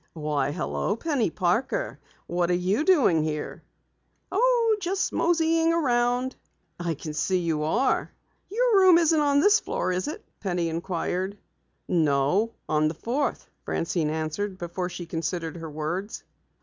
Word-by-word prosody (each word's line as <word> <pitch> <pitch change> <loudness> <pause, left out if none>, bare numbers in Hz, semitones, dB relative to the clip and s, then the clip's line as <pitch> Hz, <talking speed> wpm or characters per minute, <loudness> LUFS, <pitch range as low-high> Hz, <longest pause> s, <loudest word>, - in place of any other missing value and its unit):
"Why, 150 -3 -1
hello, 185 +5 -2
Penny 270 - 0
Parker. 230 - -1 0.3
What 175 0 0
are 180 - +3
you 185 +9 +1
doing 285 - +4
here?" 150 -1 -4 0.7
"Oh, 465 +1 +3
just 365 +1 -1
moseying 330 -1 +2
around." 250 -4 +1 0.4
"I 170 -2 -2
can 155 +2 -7
see 185 +4 +1
you 165 -3 -1
are!" 160 - +1 0.4
"Your 460 0 +3
room 370 -3 +7
isn't 325 -2 +3
on 285 -1 +3
this 410 +4 +5
floor, - - -2
is 185 +5 -1
it?" 300 - -6
Penny 175 -4 -1
inquired. 180 +3 -2 0.5
"No, 160 +6 +2 0.2
on 155 0 +2
the 155 - -3
fourth," 250 - -2 0.2
Francine 165 -2 -1
answered 160 +6 -3
before 175 +1 -4
she 175 -1 -7
considered 165 0 -3
her 165 -1 -7
words. 165 +8 -4
185 Hz, 140 wpm, -26 LUFS, -, 0.7 s, room